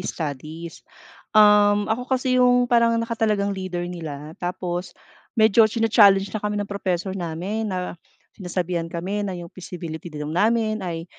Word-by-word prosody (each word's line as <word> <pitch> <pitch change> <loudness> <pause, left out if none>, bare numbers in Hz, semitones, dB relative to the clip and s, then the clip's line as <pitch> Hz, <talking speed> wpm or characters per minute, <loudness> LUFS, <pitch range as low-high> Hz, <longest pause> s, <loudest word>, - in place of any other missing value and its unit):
studies, 160 0 -6 0.6
um, 210 -1 +6
ako 240 +4 -2
kasi 255 -1 +1
yung 245 0 +5
parang 235 -1 +3
nakatalagang 220 -3 0
leader 185 -2 -4
nila 155 -4 -7
tapos 175 0 -4 0.4
medyo 220 0 +5
china-challenge 205 -3 +4
na 215 - -3
kami 210 0 -2
ng 205 -1 -3
professor 190 -1 -2
namin 190 +5 -3
na 180 -2 -3 0.4
sinasabihan 180 -3 -3
kami 180 +5 -3
na 195 -3 -3
yung 170 -1 -9
feasibility 170 -3 -7
daw 150 -1 -6
namin 215 +5 +1
ay 170 -3 -4
195 Hz, 140 wpm, -23 LUFS, 175-220 Hz, 0.6 s, um